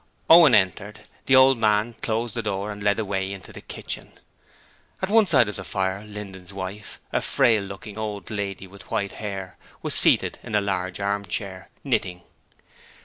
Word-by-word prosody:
Owen 165 -7 +9
entered; 105 +2 0 0.3
the 130 - +5
old 130 -1 +6
man 110 +1 +2
closed 115 0 -1
the 115 - -2
door 100 -1 -3
and 105 0 -8
led 100 0 +2
the 110 - -1
way 95 -1 -2
into 100 -1 -9
the - - -10
kitchen. - - -7 0.9
At 190 - -2
one 220 -1 +5
side 130 - +4
of 105 - -5
the 100 - -6
fire, 95 +1 -2
Linden's 100 -3 -9
wife, 100 +2 -7
a - - +1
frail 110 -3 +3
looking 100 +2 -8
old 105 -3 -5
lady 100 -2 -4
with 95 +1 -15
white 100 -1 -1
hair, 95 -3 -6 0.3
was - - 0
seated - - +4
in 105 - -5
a - - +5
large 95 -2 -2
armchair, 100 -1 -3
knitting. 90 -1 -1
100 Hz, 175 wpm, -24 LUFS, 95-110 Hz, 0.9 s, Owen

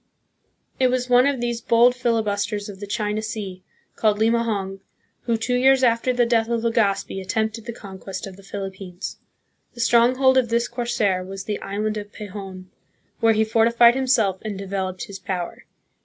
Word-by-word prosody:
It 260 - +4
was 250 0 -1
one 250 +2 +6
of 280 -3 0
these 240 -1 -2
bold 235 +2 +5
filibusters 215 -4 -1
of 195 -2 -9
the 205 - -7
China 210 +1 -1
Sea, 210 -4 -5 0.3
called 215 -2 +2
Limahong, 220 -4 0 0.5
who 230 -1 +1
two 235 +3 -2
years 265 +1 +4
after 235 +1 +3
the 245 -1 +2
death 230 -1 +1
of 230 -1 -1
Legazpi 205 -4 0
attempted 220 +3 -2
the - - -2
conquest 195 -3 -8
of 195 -2 -9
the 195 - -15
Philippines. 195 -2 -7 0.6
The - - -12
strong 235 +1 +4
hold 260 0 +5
of 240 -3 -1
this 235 +1 +1
corsair 225 -6 0
was 195 +1 -7
the 210 0 -4
island 215 +2 -2
of 205 0 -7
Pehon, 195 -3 -8 0.5
where 225 0 +4
he 220 0 +3
fortified 235 +2 +5
himself 240 -8 +1
and 210 -3 -5
developed 190 -1 -4
his 200 -4 -8
power. 180 -2 -5
220 Hz, 170 wpm, -23 LUFS, 195-235 Hz, 0.6 s, one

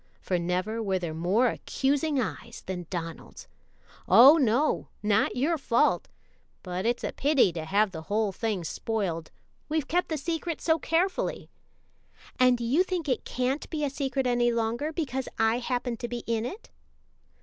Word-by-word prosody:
for 180 -2 -1
never 185 +6 -1
were 195 -3 0
there 170 -3 -4
more 190 +10 +2
accusing 280 +4 0
eyes 235 -1 -5
than 180 -3 -5
Donald's. 165 -3 -7 0.6
"Oh, 275 +7 +9
no; 270 +2 +1 0.2
not 210 +1 +2
your 300 +6 +1
fault, 235 -3 +2 0.6
but 185 +3 -3
it's 240 0 0
a - - -2
pity 275 - +3
to 160 -1 -5
have 200 +4 +2
the 160 -3 -7
whole 210 +4 0
thing 205 -2 -2
spoiled. 175 -2 -3 0.4
We've 310 -3 -1
kept 355 +2 0
the 315 - -1
secret 330 +2 -3
so 320 -1 +2
carefully." 355 +5 -1 0.9
"And 255 -1 +5
do 240 - -5
you 260 +9 +3
think 365 -4 -2
it 255 -4 -1
can't 255 +3 -2
be 310 -2 -3
a 280 - -2
secret 270 -1 -2
any 240 -1 +2
longer 235 +6 -1
because 265 -6 -3
I 225 +2 +2
happen 245 -1 -2
to 240 - -4
be 240 0 -5
in 230 0 -1
it?" 405 - -10
240 Hz, 165 wpm, -27 LUFS, 205-285 Hz, 0.9 s, Oh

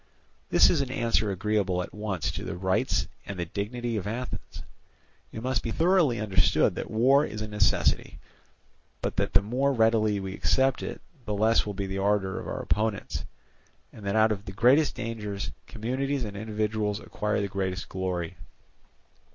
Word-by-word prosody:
This - - +6
is 160 - +2
an 135 - -2
answer 115 -4 +1
agreeable 100 -2 0
at - - -10
once 105 -5 -2
to - - -5
the - - -4
rights 95 +1 +1 0.2
and 100 - -5
the 85 - -2
dignity 115 +6 -3
of 100 - -3
Athens. 125 +4 -5 0.7
It 110 - -7
must 130 -4 0
be - - -3
thoroughly 165 - +3
understood 100 -3 +3
that - - -5
war 130 +6 +4
is 110 -7 -4
a 110 - -3
necessity; 105 -2 +1 0.9
but - - -1
that - - 0
the - - +5
more 130 +6 +1
readily 110 -4 +3
we 95 -1 -5
accept 130 +5 +2
it, - - -5 0.2
the 105 - -2
less 110 +2 +3
will 100 - -4
be 100 0 -2
the 95 0 -3
ardour 100 -1 +1
of - - -7
our - - -4
opponents, 105 0 -1 0.7
and 110 - -12
that 100 - 0
out 110 0 +5
of 100 -2 -3
the 95 - -7
greatest 125 +8 +4
dangers 105 - -4 0.2
communities 130 +4 -2
and 100 -1 -7
individuals 105 0 -1
acquire 105 0 -2
the 100 - 0
greatest 95 -1 -3
glory. 90 -3 -3
105 Hz, 175 wpm, -27 LUFS, 100-120 Hz, 0.9 s, This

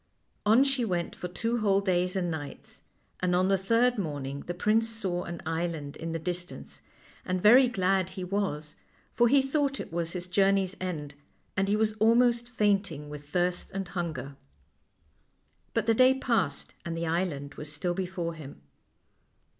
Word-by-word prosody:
On 225 +5 +7
she 270 -2 0
went 175 -6 -2
for 180 - -5
two 230 +6 -1
whole 200 -2 +3
days 180 -1 0
and 175 -3 0
nights, 145 -3 -8 0.4
and 180 -1 +1
on 185 +1 +3
the 195 - +4
third 230 +4 +2
morning 140 -5 -3
the 175 - -2
prince 220 +5 +2
saw 190 -6 -3
an 170 -1 -7
island 160 -3 -3
in 165 0 -5
the 165 - -1
distance, 175 +2 -6 0.4
and 185 0 -1
very 245 +7 +7
glad 190 -5 +1
he 190 0 -6
was; 180 -6 -2 0.4
for 240 +1 +4
he 270 +2 +5
thought 275 0 0
it - - -7
was 170 0 -2
his 180 -1 -4
journey's 195 +1 +2
end, 155 -6 -4 0.4
and 195 -1 +1
he 205 - +2
was 215 0 +1
almost 235 +2 +4
fainting 200 - 0
with 145 -1 -9
thirst 180 +2 0
and 195 -2 -3
hunger. 150 -7 -4 1.4
But - - +1
the 225 - +4
day 255 +3 +5
passed 220 - -1
and 165 -1 -4
the 170 - -2
island 160 -4 -2
was 150 0 -7
still 175 +4 -1
be 185 0 -2
fore 175 -2 -3
him. 140 - -11
185 Hz, 170 wpm, -29 LUFS, 165-215 Hz, 1.4 s, On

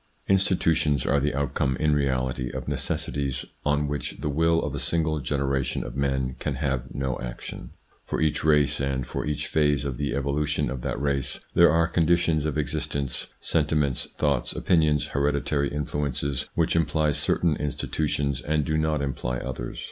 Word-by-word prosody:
Institutions 85 -7 +2
are 70 - +3
the 70 -1 0
outcome 70 -1 0
in 75 -1 +2
reality 65 -3 0
of 65 +1 -6
necessities 70 -2 -2 0.2
on 75 0 +1
which 75 0 -3
the 75 - -2
will 80 +3 +3
of - - -3
a - - -3
single 80 -2 0
generation 70 -1 -1
of - - -7
men 65 -2 0
can 70 - -2
have 65 -3 -1
no 65 -2 -2
action. - - -7 0.3
For - - -3
each 80 -1 +1
race, 75 -2 +3
and 65 -2 -1
for - - -4
each 75 0 -1
phase 75 -2 +2
of 65 -3 -3
the 70 0 -1
evolution 70 -1 0
of 65 -2 -4
that - - -3
race, 70 -1 -1
there 85 0 +7
are 85 +2 +3
conditions 85 -2 +2
of 75 -1 -1
existence, 70 -2 -2
sentiments, 75 -4 +1
thoughts, 70 -5 +1
opinions, 80 -4 +2
hereditary 70 0 0
influences 70 -2 -2
which 85 -1 +2
imply 80 -1 +2
certain 75 +2 +3
institutions 70 -1 -1
and 75 -1 0
do 80 +1 +1
not 80 -2 +1
imply 60 -2 -2
others. 60 -1 -5
70 Hz, 165 wpm, -26 LUFS, 65-75 Hz, 0.3 s, there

